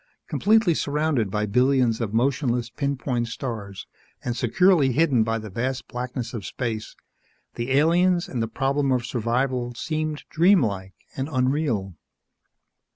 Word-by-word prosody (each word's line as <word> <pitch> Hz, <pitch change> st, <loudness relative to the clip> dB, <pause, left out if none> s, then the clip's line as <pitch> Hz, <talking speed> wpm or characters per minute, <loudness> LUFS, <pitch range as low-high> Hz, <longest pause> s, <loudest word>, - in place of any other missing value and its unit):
Completely 215 Hz, -4 st, +3 dB
surrounded 145 Hz, -7 st, 0 dB
by 105 Hz, +2 st, -1 dB
billions 125 Hz, +1 st, +2 dB
of 110 Hz, -3 st, -2 dB
motionless, 125 Hz, 0 st, 0 dB
pin 140 Hz, -1 st, -2 dB
point 120 Hz, -2 st, -2 dB
stars 110 Hz, -5 st, -6 dB, 0.4 s
and 120 Hz, -, -1 dB
securely 145 Hz, -, +3 dB
hidden 140 Hz, -4 st, +3 dB
by 115 Hz, +1 st, -1 dB
the 110 Hz, -2 st, -8 dB
vast 130 Hz, +5 st, -3 dB
blackness 125 Hz, -1 st, -5 dB
of 110 Hz, -4 st, -5 dB
space, 110 Hz, -2 st, -4 dB, 0.6 s
the 120 Hz, +2 st, -4 dB
aliens 175 Hz, +4 st, +3 dB
and 125 Hz, -, -3 dB
the 115 Hz, -, 0 dB
problem 135 Hz, +4 st, 0 dB
of 125 Hz, -2 st, +1 dB
survival 125 Hz, 0 st, -1 dB
seemed 155 Hz, +2 st, -3 dB
dream 180 Hz, 0 st, +5 dB
like 95 Hz, -3 st, -3 dB, 0.2 s
and 135 Hz, +2 st, -3 dB
unreal. 130 Hz, -, 0 dB
125 Hz, 140 wpm, -24 LUFS, 115-145 Hz, 0.6 s, dream